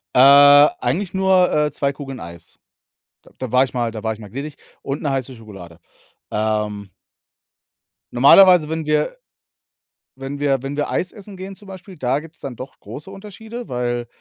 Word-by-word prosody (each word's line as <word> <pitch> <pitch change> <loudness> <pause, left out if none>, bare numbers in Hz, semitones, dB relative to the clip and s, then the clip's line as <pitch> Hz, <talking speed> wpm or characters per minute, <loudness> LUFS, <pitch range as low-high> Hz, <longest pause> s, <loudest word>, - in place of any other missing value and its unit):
Äh, 145 +2 +8
eigentlich 175 +11 -2
nur, 190 -1 +3
äh, 150 -1 +1
2 140 -1 -1
Kugeln 135 -2 -9
Eis. 85 0 -12 0.7
D - - -19
da 130 -3 -6
war 130 +1 +4
ich 130 - -6
mal 120 -2 -1
da 110 -1 -7
war 110 0 -2
ich 110 - -14
mal 105 - -11
gnädig 145 +4 -6 0.3
und 140 +2 -5
'ne 145 - -1
heiße 130 -1 -4
Schokolade. 95 -7 -13 0.5
Ähm 105 -2 -2 1.2
normalerweise, 155 +5 +6
wenn 160 -1 -3
wir 150 - 0 1.0
wenn 135 +1 -7
wir 135 -3 0
wenn 140 +1 -5
wir 145 - -2
Eis 180 - -2
essen 205 -1 -12
gehen 190 +1 -9
zum 205 - -17
Beispiel, 190 0 -11
da 130 +1 -1
gibt's 165 +1 -15
dann 135 - -7
doch 130 - -10
große 150 +7 -10
Unterschiede. 215 +4 -10
Weil, 120 -1 -3
140 Hz, 175 wpm, -20 LUFS, 120-180 Hz, 1.2 s, Äh